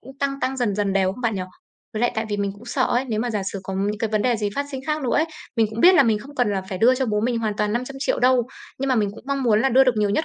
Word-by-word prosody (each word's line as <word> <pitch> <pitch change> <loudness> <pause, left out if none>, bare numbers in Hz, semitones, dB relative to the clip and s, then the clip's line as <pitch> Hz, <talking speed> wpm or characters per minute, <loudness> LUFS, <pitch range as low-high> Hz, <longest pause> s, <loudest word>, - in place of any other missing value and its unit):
cũng 265 +2 -14
tăng 275 -1 -2
tăng 265 +1 -1
dần 235 -6 0
dần 205 -1 0
đều 190 -1 +2
không 250 - -11
bạn 230 -3 0
nhỉ? 190 - -2 0.5
Với 215 - -3
lại 240 - +2
tại 220 +1 -1
vì 205 - -2
mình 200 -1 -1
cũng 205 +4 -15
sợ 240 - -1
ấy, 250 +2 0
nếu 215 -2 -1
mà 245 +1 -1
giả 210 -3 -2
sử 195 - -5
có 190 - -5
những 205 +2 -1
cái 225 - -1
vấn 215 - +2
đề 245 -2 +2
gì 210 -1 -1
phát 280 0 -2
sinh 265 -2 -5
khác 305 -1 -1
nữa 250 - 0
ấy. 310 - +3 0.3
Mình 225 -1 +3
cũng 220 +1 -5
biết 365 +7 +7
là 335 - +7
mình 225 -4 +2
không 275 +7 -12
cần 245 -5 +1
là 190 -1 -1
phải 185 - -4
đưa 245 +6 +5
cho 260 0 -1
bố 210 -2 0
mình 235 +1 0
hoàn 215 -2 -2
toàn 210 -1 0
500.000.000 270 +4 -2
đâu, 250 -1 +3 0.3
nhưng 275 +1 -2
mà 260 - +3
mình 210 -4 +1
cũng - - -13
mong 275 -1 -1
muốn 220 -4 +3
là 270 - +3
đưa 265 +1 +5
được 255 -3 +2
nhiều 210 -1 +1
nhất 310 +10 +1
230 Hz, 350 wpm, -22 LUFS, 210-260 Hz, 0.5 s, biết